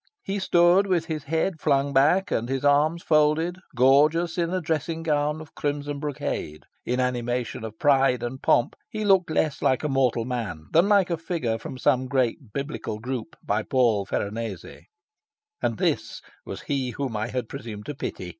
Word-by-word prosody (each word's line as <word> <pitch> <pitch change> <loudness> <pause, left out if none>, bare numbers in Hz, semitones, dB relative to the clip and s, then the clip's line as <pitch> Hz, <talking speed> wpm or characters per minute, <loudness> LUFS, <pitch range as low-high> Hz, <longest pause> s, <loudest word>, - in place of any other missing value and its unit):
He 200 +1 -2
stood 180 +1 +4
with 175 -4 +1
his 155 -3 -4
head 160 +2 -1
flung 140 -1 +2
back 165 +9 +3
and 115 +2 -1
his 135 +1 -2
arms 150 +4 +3
folded, 155 +3 +2 0.2
gorgeous 150 +7 +4
in 170 -1 0
a 185 - 0
dressing 165 0 -2
gown 150 -1 0
of 160 - -12
crimson 145 0 -3
brocade. 135 - -4 0.2
In 125 +1 0
animation 125 -2 -2
of 110 -1 -7
pride 135 -3 +3
and 130 +2 -5
pomp, 120 - +2
he 215 -1 -3
looked 190 -4 +4
less 155 -2 0
like 130 +2 +2
a - - +1
mortal 130 -4 +1
man 110 -11 -4
than 170 +5 +4
like 200 -4 +4
a 170 - 0
figure 160 -9 -2
from 130 - -7
some 130 0 +2
great 130 -3 -1
biblical 140 -4 -4
group 130 +6 -5
by 105 +2 0
Paul 115 -5 +2
Veronese. 105 -2 -5 0.7
And - - 0
this - - -1 0.2
was - - -6
he 135 -3 -2
whom 135 -5 -3
I 105 +2 -1
had 125 -1 -3
presumed 105 -2 -8
to 150 - -4
pity! 90 -9 -5
140 Hz, 175 wpm, -25 LUFS, 120-160 Hz, 0.7 s, stood